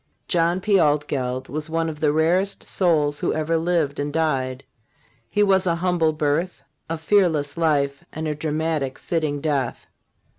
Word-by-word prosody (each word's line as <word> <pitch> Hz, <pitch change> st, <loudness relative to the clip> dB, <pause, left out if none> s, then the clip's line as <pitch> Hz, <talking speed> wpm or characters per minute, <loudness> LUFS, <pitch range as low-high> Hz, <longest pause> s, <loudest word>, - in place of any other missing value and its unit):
John 175 Hz, +1 st, +1 dB
P. 200 Hz, 0 st, +3 dB
Altgeld 145 Hz, -4 st, 0 dB
was 155 Hz, +2 st, -5 dB
one 165 Hz, 0 st, 0 dB
of 155 Hz, -2 st, -5 dB
the 150 Hz, -1 st, +2 dB
rarest 175 Hz, +6 st, +1 dB
souls 150 Hz, -5 st, +1 dB
who -, -, 0 dB
ever 155 Hz, +1 st, 0 dB
lived 165 Hz, -4 st, 0 dB
and 145 Hz, +1 st, -2 dB
died. 135 Hz, -5 st, -1 dB, 0.7 s
His 205 Hz, -, +2 dB
was 190 Hz, -1 st, +3 dB
a 170 Hz, -, +2 dB
humble 170 Hz, -2 st, +1 dB
birth, 155 Hz, +4 st, -1 dB, 0.3 s
a 165 Hz, -, -2 dB
fearless 160 Hz, -5 st, +2 dB
life 145 Hz, -4 st, +1 dB
and 155 Hz, 0 st, -4 dB
a 150 Hz, -, 0 dB
dramatic, 155 Hz, -2 st, -2 dB
fitting 155 Hz, -4 st, -2 dB
death. 140 Hz, -5 st, -1 dB
155 Hz, 155 wpm, -23 LUFS, 145-170 Hz, 0.7 s, P